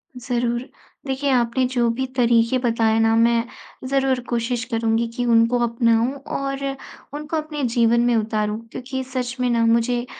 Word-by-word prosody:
ज़रूर। 240 Hz, -1 st, -1 dB, 0.5 s
देखिए 270 Hz, +1 st, -1 dB
आपने 245 Hz, +1 st, +2 dB
जो 240 Hz, -2 st, +2 dB
भी 260 Hz, -, 0 dB
तरीके 235 Hz, 0 st, +3 dB
बताए 225 Hz, -2 st, +1 dB
ना 225 Hz, 0 st, +3 dB
मैं 230 Hz, 0 st, +3 dB, 0.4 s
ज़रूर 270 Hz, -1 st, +1 dB
कोशिश 235 Hz, 0 st, -1 dB
करूंगी 225 Hz, 0 st, +1 dB
कि 245 Hz, -1 st, -1 dB
उनको 235 Hz, +1 st, +3 dB
अपनाऊँ 230 Hz, +1 st, +2 dB, 0.2 s
और 275 Hz, 0 st, -3 dB, 0.5 s
उनको 300 Hz, +2 st, -4 dB
अपने 305 Hz, -2 st, -4 dB
जीवन 235 Hz, 0 st, +3 dB
में 245 Hz, -, +3 dB
उतारूँ 215 Hz, -1 st, -1 dB
क्योंकि 260 Hz, +1 st, -5 dB
सच 255 Hz, 0 st, -2 dB
में 250 Hz, -1 st, +1 dB
ना 230 Hz, -1 st, +2 dB
मुझे 235 Hz, +1 st, +1 dB
240 Hz, 155 wpm, -22 LUFS, 230-255 Hz, 0.5 s, तरीके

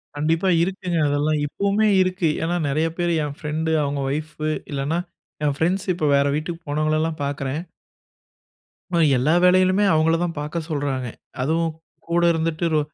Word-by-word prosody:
கண்டிப்பா. 160 Hz, +5 st, +1 dB
இருக்குங்க 180 Hz, -1 st, -2 dB
அதெல்லாம். 145 Hz, +1 st, +1 dB
இப்போவுமே 200 Hz, +7 st, +1 dB
இருக்கு. 185 Hz, -2 st, +1 dB
ஏன்னா 170 Hz, +2 st, 0 dB
நிறைய 155 Hz, +4 st, +1 dB
பேரு, 175 Hz, -1 st, 0 dB
என் 145 Hz, -1 st, -4 dB
ஃப்ரெண்டு 155 Hz, +2 st, -2 dB
அவங்க 140 Hz, 0 st, -2 dB
ஒய்ஃப் 155 Hz, +2 st, -4 dB, 0.4 s
இல்லனா, 145 Hz, +4 st, -1 dB, 0.5 s
என் 145 Hz, -1 st, +1 dB
ஃப்ரெண்ட்ஸ் 185 Hz, +6 st, 0 dB
இப்போ 160 Hz, -, -1 dB
வேற 140 Hz, 0 st, +3 dB
வீட்டுக்கு 165 Hz, +3 st, -4 dB
போனவங்களலாம் 155 Hz, +2 st, 0 dB
பார்க்குறேன் 140 Hz, +1 st, -3 dB, 1.3 s
ஆமா. 170 Hz, -, +2 dB, 0.2 s
எல்லா 140 Hz, +6 st, +2 dB
வேலைளுமே 185 Hz, +2 st, +4 dB
அவங்கள 160 Hz, +1 st, +3 dB
தான் 170 Hz, -1 st, -2 dB
பாக்க 150 Hz, +3 st, -4 dB
சொல்றாங்க. 140 Hz, -4 st, -2 dB, 0.3 s
அதுவும் 165 Hz, +4 st, +1 dB, 0.4 s
கூட 170 Hz, +1 st, +1 dB
இருந்துட்டு, 165 Hz, 0 st, -1 dB
ரொ 155 Hz, -, +4 dB
160 Hz, 145 wpm, -22 LUFS, 145-175 Hz, 1.3 s, வேலைளுமே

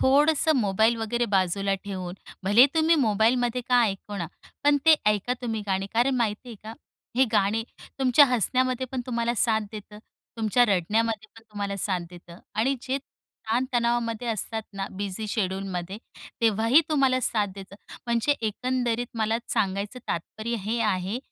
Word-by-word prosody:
थोडंसं 295 Hz, +3 st, +4 dB
मोबाईल 220 Hz, +1 st, +2 dB
वगैरे 235 Hz, +2 st, -1 dB
बाजूला 195 Hz, +1 st, +1 dB
ठेवून, 185 Hz, -3 st, -5 dB, 0.3 s
भले 205 Hz, +6 st, +7 dB
तुम्ही 320 Hz, +1 st, +4 dB
मोबाईलमध्ये 235 Hz, +3 st, +2 dB
का 250 Hz, -1 st, +5 dB
ऐकू 205 Hz, -1 st, -2 dB
ना, 175 Hz, -4 st, -3 dB, 0.4 s
पण 290 Hz, 0 st, +5 dB
ते 320 Hz, -, +9 dB, 0.2 s
ऐका 210 Hz, +3 st, -1 dB
तुम्ही 225 Hz, -3 st, -2 dB
गाणे. 190 Hz, 0 st, -1 dB
कारण 245 Hz, +4 st, +2 dB
माहिती 230 Hz, 0 st, -1 dB
आहे 230 Hz, -, -8 dB
का? 220 Hz, -, -7 dB, 0.4 s
हे 265 Hz, -, +6 dB
गाणे 215 Hz, +1 st, +2 dB, 0.4 s
तुमच्या 265 Hz, +2 st, +6 dB
हसण्यामध्ये 255 Hz, +1 st, 0 dB
पण 260 Hz, -, -2 dB
तुम्हाला 235 Hz, -1 st, -1 dB
साथ 220 Hz, -1 st, +2 dB
देतं, 210 Hz, 0 st, -9 dB, 0.4 s
तुमच्या 225 Hz, +2 st, +3 dB
रडण्यामध्ये 215 Hz, +4 st, 0 dB
पण 225 Hz, -, -14 dB
तुम्हाला 200 Hz, -1 st, -3 dB
साथ 190 Hz, -2 st, -1 dB
देतं 175 Hz, -1 st, -13 dB, 0.2 s
आणि 250 Hz, +6 st, +1 dB
जे 265 Hz, +1 st, -1 dB, 0.5 s
ताणतणावामध्ये 235 Hz, -1 st, 0 dB
असतात 220 Hz, 0 st, -3 dB
ना, 195 Hz, -1 st, -4 dB
बिझी 200 Hz, +2 st, -5 dB
शेड्यूलमध्ये, 190 Hz, -2 st, -3 dB, 0.4 s
तेव्हा 220 Hz, -1 st, +2 dB
ही 275 Hz, +7 st, +7 dB
तुम्हाला 270 Hz, -4 st, +2 dB
साथ 215 Hz, -4 st, +1 dB
देतं. 195 Hz, 0 st, -10 dB, 0.3 s
म्हणजे 235 Hz, +4 st, +2 dB
एकंदरीत 245 Hz, +1 st, -1 dB
मला 220 Hz, 0 st, +1 dB
सांगायचं 200 Hz, +4 st, -1 dB
तात्पर्य 220 Hz, +7 st, -3 dB
हे 220 Hz, +5 st, -2 dB
आहे 195 Hz, +1 st, -1 dB
225 Hz, 150 wpm, -26 LUFS, 200-245 Hz, 0.5 s, ते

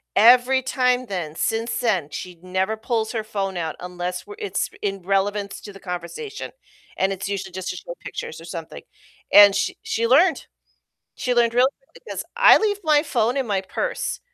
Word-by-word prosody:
Every 250 Hz, +4 st, +6 dB
time 250 Hz, -1 st, +1 dB
then, 170 Hz, -6 st, -4 dB
since 225 Hz, +4 st, -1 dB
then, 190 Hz, -, 0 dB
she 180 Hz, +3 st, -7 dB
never 190 Hz, +4 st, -1 dB
pulls 220 Hz, -1 st, -1 dB
her 220 Hz, -3 st, -2 dB
phone 195 Hz, -3 st, -3 dB
out 160 Hz, -2 st, -3 dB
unless 180 Hz, 0 st, -5 dB
we're 415 Hz, 0 st, -10 dB
it's 420 Hz, -, -2 dB
in 195 Hz, -2 st, -2 dB
relevance 200 Hz, +2 st, -1 dB
to 205 Hz, -, -10 dB
the 195 Hz, -, -12 dB
conversation, 180 Hz, -, -6 dB, 0.4 s
and 190 Hz, +1 st, +1 dB
it's 195 Hz, +1 st, -4 dB
usually 195 Hz, -2 st, -4 dB
just 185 Hz, 0 st, -5 dB
to -, -, -3 dB
show 170 Hz, -1 st, -8 dB
pictures 160 Hz, -, -7 dB
or 165 Hz, -, -11 dB
something. 165 Hz, -1 st, -8 dB, 0.5 s
And 205 Hz, -1 st, +9 dB
sh 205 Hz, -, +1 dB
she 230 Hz, +1 st, -1 dB
learned. 320 Hz, +8 st, +4 dB, 0.7 s
She 250 Hz, -, -1 dB
learned 235 Hz, -1 st, +3 dB
real 250 Hz, +2 st, +5 dB, 0.2 s
quick, -, -, -39 dB
because -, -, -5 dB
I 485 Hz, -, +8 dB
leave 415 Hz, -2 st, 0 dB
my 300 Hz, -1 st, +4 dB
phone 240 Hz, -4 st, 0 dB
in 270 Hz, -2 st, 0 dB
my 200 Hz, -3 st, 0 dB
purse, -, -, -3 dB
205 Hz, 185 wpm, -23 LUFS, 185-250 Hz, 0.7 s, And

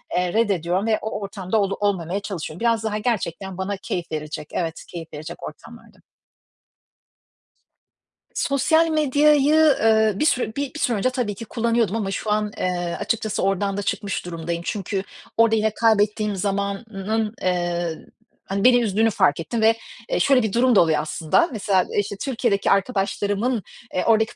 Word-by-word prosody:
eee, 180 Hz, -1 st, 0 dB
reddediyorum 195 Hz, -3 st, +1 dB
ve 220 Hz, -1 st, +2 dB
o 220 Hz, -1 st, -4 dB
ortamda 195 Hz, 0 st, -3 dB
ol 195 Hz, -1 st, 0 dB
olmamaya 195 Hz, -2 st, 0 dB
çalışıyorum. 180 Hz, -5 st, -6 dB
Biraz 230 Hz, -1 st, +1 dB
daha 215 Hz, -1 st, -1 dB
gerçekten 195 Hz, -4 st, -2 dB
bana 190 Hz, +1 st, -3 dB
keyif 175 Hz, -3 st, -5 dB
verecek 155 Hz, -1 st, -5 dB
evet, 165 Hz, -2 st, -3 dB
keyif 165 Hz, -3 st, -9 dB
verecek 150 Hz, +1 st, -8 dB
ortamlarda. -, -, -11 dB, 2.4 s
Sosyal 315 Hz, +4 st, +2 dB
medyayı, 300 Hz, -1 st, +4 dB, 0.2 s
eee, 220 Hz, -1 st, +4 dB
bir 300 Hz, -, 0 dB
sü 250 Hz, -7 st, +1 dB
bir 280 Hz, -1 st, -3 dB
bir 310 Hz, -, -7 dB
süre 245 Hz, -7 st, +1 dB
önce 255 Hz, +6 st, +1 dB
tabii 245 Hz, -6 st, -2 dB
ki 230 Hz, -, -8 dB
kullanıyordum 230 Hz, -2 st, 0 dB
ama 200 Hz, -3 st, -2 dB
şu 210 Hz, +3 st, -3 dB
an, 210 Hz, 0 st, 0 dB
eee, 175 Hz, -1 st, -2 dB
açıkçası 220 Hz, -2 st, -1 dB
oradan 195 Hz, +1 st, 0 dB
da -, -, -1 dB
çıkmış 200 Hz, -2 st, -3 dB
durumdayım. 170 Hz, 0 st, -4 dB
Çünkü 195 Hz, -2 st, -2 dB, 0.3 s
orada 225 Hz, 0 st, +5 dB
yine 220 Hz, 0 st, +1 dB
kaybettiğim 210 Hz, -2 st, +2 dB
zamanın, 200 Hz, +2 st, -2 dB
eee, 175 Hz, -2 st, -1 dB, 0.4 s
hani 195 Hz, +1 st, -2 dB
beni 245 Hz, -1 st, +6 dB
üzdüğünü 220 Hz, 0 st, +2 dB
fark 145 Hz, -8 st, +2 dB
ettim 190 Hz, +8 st, -3 dB
ve, 225 Hz, +1 st, +6 dB, 0.4 s
eee, -, -, 0 dB
şöyle 265 Hz, -3 st, +4 dB
bir 215 Hz, -3 st, -2 dB
durum 245 Hz, 0 st, +4 dB
da -, -, +7 dB
oluyor 160 Hz, -3 st, +2 dB
aslında: 160 Hz, -, +1 dB
Mesela, 200 Hz, -5 st, +1 dB
işte, 205 Hz, 0 st, -2 dB
Türkiye'deki 235 Hz, -6 st, 0 dB
arkadaşlarımın, 205 Hz, +2 st, 0 dB, 0.3 s
eee, 180 Hz, -, 0 dB
oradaki 220 Hz, 0 st, +3 dB
205 Hz, 160 wpm, -23 LUFS, 185-225 Hz, 2.4 s, da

